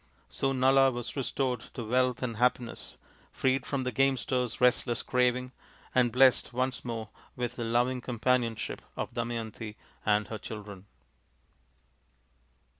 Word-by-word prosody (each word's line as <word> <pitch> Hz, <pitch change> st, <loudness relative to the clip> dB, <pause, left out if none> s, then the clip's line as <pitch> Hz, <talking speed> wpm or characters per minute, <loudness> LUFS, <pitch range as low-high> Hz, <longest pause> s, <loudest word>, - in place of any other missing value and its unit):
So 135 Hz, -, 0 dB
Nala 135 Hz, +1 st, +5 dB
was 120 Hz, -2 st, -5 dB
restored 130 Hz, -2 st, -1 dB, 0.2 s
to 120 Hz, -, -4 dB
wealth 125 Hz, +2 st, +1 dB
and 115 Hz, -3 st, -2 dB
happiness, 125 Hz, 0 st, -1 dB, 0.3 s
freed 130 Hz, -1 st, 0 dB
from 135 Hz, -2 st, -1 dB
the 125 Hz, -, -1 dB
gamester's 130 Hz, -1 st, +1 dB
restless 120 Hz, -1 st, +2 dB
craving, 125 Hz, 0 st, +1 dB, 0.4 s
and 125 Hz, -2 st, +4 dB
blessed 130 Hz, -1 st, +4 dB
once 130 Hz, +1 st, -1 dB
more 115 Hz, -3 st, -4 dB, 0.3 s
with 120 Hz, -1 st, -3 dB
the 120 Hz, -, -3 dB
loving 120 Hz, +2 st, +1 dB
companionship 120 Hz, -1 st, 0 dB, 0.2 s
of -, -, -3 dB
Damayanti 115 Hz, -2 st, -4 dB, 0.3 s
and 105 Hz, 0 st, +2 dB
her 110 Hz, -, -5 dB
children. 105 Hz, -3 st, -8 dB
125 Hz, 125 wpm, -30 LUFS, 115-130 Hz, 0.4 s, Nala